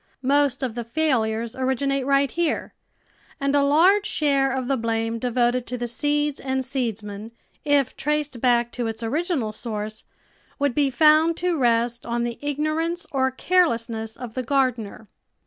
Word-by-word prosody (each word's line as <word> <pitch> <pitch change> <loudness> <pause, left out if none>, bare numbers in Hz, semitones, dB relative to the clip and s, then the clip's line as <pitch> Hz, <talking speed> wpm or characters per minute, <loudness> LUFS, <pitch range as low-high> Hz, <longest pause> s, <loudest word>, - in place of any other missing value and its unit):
Most 280 0 +2
of 250 -4 -2
the 240 +1 -4
failures 230 -4 0
originate 265 +1 -1
right 275 -1 +3
here, 340 -2 -1 0.7
and 275 0 0
a 285 - +4
large 350 +9 +4
share 275 -3 +1
of 260 -1 -2
the 275 - +2
blame 225 -1 -1
devoted 245 0 0
to 250 - -4
the 240 0 -3
seeds 295 +4 -1
and 265 -1 -2
seedsman, 220 -5 -4 0.3
if 285 -3 +2
traced 295 -4 -2
back 240 -1 +2
to 240 -2 -3
its 225 +1 -5
original 280 - -1
source, 215 -1 -5 0.5
would 285 -2 +1
be 285 0 +2
found 310 +4 +4
to 360 0 0
rest 235 -3 +1
on 235 0 -2
the 235 -1 -4
ig 290 -1 -3
norance 325 +3 -1
or 265 -1 +2
carelessnes 230 -9 0
of 245 -3 -8
the 255 - -2
gardener. 245 -5 -1
260 Hz, 160 wpm, -23 LUFS, 235-290 Hz, 0.7 s, a